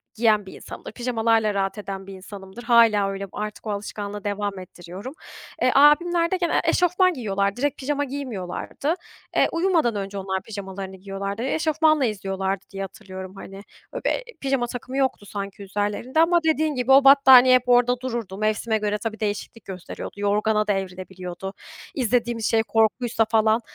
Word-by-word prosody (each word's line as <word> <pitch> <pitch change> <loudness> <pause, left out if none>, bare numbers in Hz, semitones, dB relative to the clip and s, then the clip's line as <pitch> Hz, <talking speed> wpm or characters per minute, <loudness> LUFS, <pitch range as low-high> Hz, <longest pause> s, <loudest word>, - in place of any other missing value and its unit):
giyen 215 -3 +3
bir 190 - -10
insanımdır. - - -9
Pijamalarla 225 -3 +1
rahat 195 +1 -1
eden 195 -2 -6
bir 195 - -8
insanımdır. 195 +3 -10
Hâlâ 230 -4 +5
öyle 195 -1 -6
bu. - - -11
Artık 210 +1 -5
o - - -1
alışkanlığı 205 0 -5
devam 205 -1 -3
ettiriyorum. 185 - -9 0.5
E, 255 - +4
abimler 335 +5 +5
de 375 - +2
genelde 345 -2 +1
eşofman 360 +1 +3
giyiyorlardı; 200 -5 -1
direkt 290 0 0
pijama 285 +1 -1
giymiyorlardı. 265 - -4 0.4
Eee, - - +4
uyumadan 330 - +1
önce 200 0 -4
onlar 190 0 -2
pijamalarını 195 -2 -7
giyiyorlardı. 195 +3 -5
Eşofmanla 310 0 +2
izliyorlardı 195 -2 -2
diye 195 -1 -6
hatırlıyorum 190 -1 -9
hani. 195 0 -10
Eee, 200 - -11
böyle - - 0 0.2
pijama 270 -3 0
takımı 250 +2 -6
yoktu 260 -6 0
sanki 200 0 -6
üzerlerinde 205 +8 -2
ama 345 +1 +5
dediğin 315 -1 +1
gibi 250 +1 0
o 275 +1 +8
battaniye 265 -2 +8
hep 250 0 +1
orada 245 0 +4
dururdu. 235 -7 -4
Mevsime 215 +1 0
göre 210 0 -1
tabii 220 0 -5
değişiklik 210 +1 -4
gösteriyordu. 185 -2 -7
Yorgana 210 +1 +1
da 205 - +3
evrilebiliyordu. 185 0 -6 0.4
İzlediğimiz 240 -3 0
şey 225 0 +3
korkuysa 225 +1 +1
falan, 220 +1 +2
215 Hz, 160 wpm, -24 LUFS, 195-255 Hz, 0.5 s, o